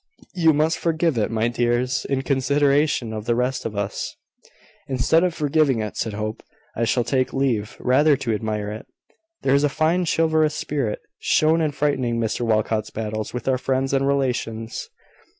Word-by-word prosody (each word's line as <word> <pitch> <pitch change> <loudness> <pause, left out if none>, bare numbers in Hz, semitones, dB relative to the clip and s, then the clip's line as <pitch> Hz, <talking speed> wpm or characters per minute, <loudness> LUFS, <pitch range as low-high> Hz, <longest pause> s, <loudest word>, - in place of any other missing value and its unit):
You 165 -3 +4
must 155 +2 +1
forgive 165 -2 +1
it, 105 - 0
my 115 0 0
dears, 120 +2 0
in 135 -1 -1
consideration 140 -2 +1
of 110 -1 -5
the 120 - +1
rest 125 +2 -1
of 105 - -8
us." 100 0 -3 0.7
"Instead 140 +6 +2
of 180 -2 0
forgiving 145 -4 +2
it," 105 -1 -4
said 110 - -2
Hope, 110 +1 -4 0.3
"I 115 - 0
shall 120 +1 +1
take 130 +1 0
leave 120 -6 -1
rather 145 +3 +4
to 125 -4 -2
admire 105 -1 -2
it. 110 +4 -8 0.6
There 135 - +3
is 140 +1 +3
a 145 - +3
fine 160 +5 +1
chivalrous 160 -1 +2
spirit 140 -8 -2 0.2
shown 160 +2 +3
in 155 -2 +1
fighting 130 -5 0
Mr 115 +1 -1
Walcot's 110 -1 0
battles 110 -1 -4
with 125 0 -6
our 130 -1 +2
friends 135 +1 -1
and 135 0 +2
relations." 120 -5 -2
130 Hz, 170 wpm, -22 LUFS, 115-150 Hz, 0.7 s, You